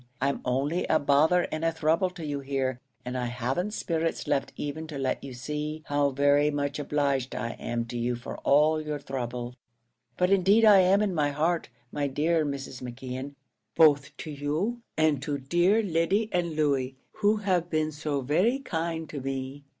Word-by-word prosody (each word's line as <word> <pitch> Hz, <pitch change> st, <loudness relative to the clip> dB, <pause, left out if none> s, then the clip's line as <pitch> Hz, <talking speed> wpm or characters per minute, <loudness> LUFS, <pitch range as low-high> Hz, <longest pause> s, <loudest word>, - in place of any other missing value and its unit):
I'm 140 Hz, 0 st, 0 dB
only 140 Hz, +7 st, 0 dB
a 155 Hz, -, +4 dB
bother 155 Hz, +5 st, +3 dB
and 155 Hz, +1 st, -3 dB
a 165 Hz, -, +2 dB
throuble 160 Hz, +3 st, +1 dB
to 165 Hz, -3 st, -6 dB
you 145 Hz, -1 st, -2 dB
here, 135 Hz, -2 st, -2 dB, 0.3 s
and 125 Hz, +1 st, -4 dB
I 125 Hz, -1 st, -1 dB
hav'n't 130 Hz, -, -2 dB
spirits 165 Hz, -1 st, -1 dB
left 135 Hz, -, 0 dB
even 155 Hz, +2 st, -4 dB
to 150 Hz, -3 st, -6 dB
let 135 Hz, -1 st, -1 dB
you 135 Hz, -2 st, -7 dB
see 150 Hz, +4 st, -4 dB
how 145 Hz, 0 st, +2 dB
very 145 Hz, +2 st, +3 dB
much 145 Hz, 0 st, -2 dB
obliged 140 Hz, -3 st, 0 dB
I 115 Hz, -1 st, -3 dB
am 120 Hz, 0 st, -3 dB
to 120 Hz, +1 st, -6 dB
you 120 Hz, +1 st, 0 dB
for 120 Hz, -, -7 dB
all 155 Hz, +2 st, +3 dB
your 150 Hz, -1 st, -3 dB
throuble; 125 Hz, -3 st, -5 dB, 0.6 s
but 180 Hz, +1 st, +2 dB
indeed 195 Hz, +4 st, +5 dB
I 205 Hz, -2 st, +8 dB
am 190 Hz, +3 st, +4 dB
in 200 Hz, -3 st, 0 dB
my 150 Hz, -3 st, +1 dB
heart, 160 Hz, +4 st, 0 dB, 0.2 s
my 145 Hz, -1 st, -1 dB
dear 155 Hz, +4 st, +1 dB
Mrs. 140 Hz, -3 st, -5 dB
McKeon, 130 Hz, +2 st, -6 dB, 0.4 s
both 145 Hz, -2 st, +4 dB
to 155 Hz, -, -6 dB
you 155 Hz, +12 st, -2 dB, 0.2 s
and 155 Hz, -4 st, +2 dB
to 145 Hz, 0 st, -2 dB
dear 175 Hz, +10 st, +2 dB
Lyddy 195 Hz, +4 st, +1 dB
and 170 Hz, -3 st, -1 dB
Louey, 135 Hz, -4 st, +1 dB, 0.2 s
who 210 Hz, 0 st, +3 dB
have 185 Hz, -5 st, 0 dB
been 155 Hz, -1 st, 0 dB
so 145 Hz, -2 st, -2 dB
very 180 Hz, -, +2 dB
kind 165 Hz, -, -3 dB
to 145 Hz, -, -5 dB
me. 135 Hz, +1 st, -5 dB
150 Hz, 180 wpm, -27 LUFS, 135-165 Hz, 0.6 s, I